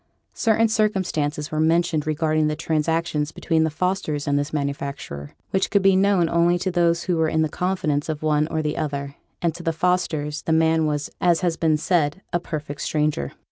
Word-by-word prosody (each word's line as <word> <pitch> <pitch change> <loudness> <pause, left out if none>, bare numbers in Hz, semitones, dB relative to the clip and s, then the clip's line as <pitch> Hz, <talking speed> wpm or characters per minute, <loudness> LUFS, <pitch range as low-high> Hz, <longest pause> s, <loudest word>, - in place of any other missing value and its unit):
Certain 225 0 +2
circumstances 180 -9 0
were 155 - -1
mentioned 160 -1 +2
regarding 155 0 +1
the 150 - -1
transactions 160 -1 -1
between 160 -1 +1
the - - 0
Fosters 160 -3 -2
and 140 - +2
this 145 +1 -3
manufacturer, 140 - -4 0.2
which 190 0 +1
could 200 -2 +2
be 195 -1 +5
known 190 -3 +3
only 170 +1 +3
to 185 +1 -2
those 170 -1 +2
who 180 -3 0
were 160 -1 +2
in 160 0 +1
the - - +1
confidence 155 -4 -1
of 155 -1 -3
one 150 -1 +2
or 160 -1 -2
the 150 0 -2
other; 140 -2 -3 0.3
and 170 -2 +2
to 175 - -9
the 165 - 0
Fosters 160 -3 -1
the 160 - 0
man 160 0 +3
was, 145 -1 -2
as 175 -2 +3
has 175 -3 +1
been 160 -2 +2
said, 165 +1 0
a 175 - +2
perfect 150 -4 -6
stranger. 150 - -1
160 Hz, 195 wpm, -23 LUFS, 150-175 Hz, 0.3 s, be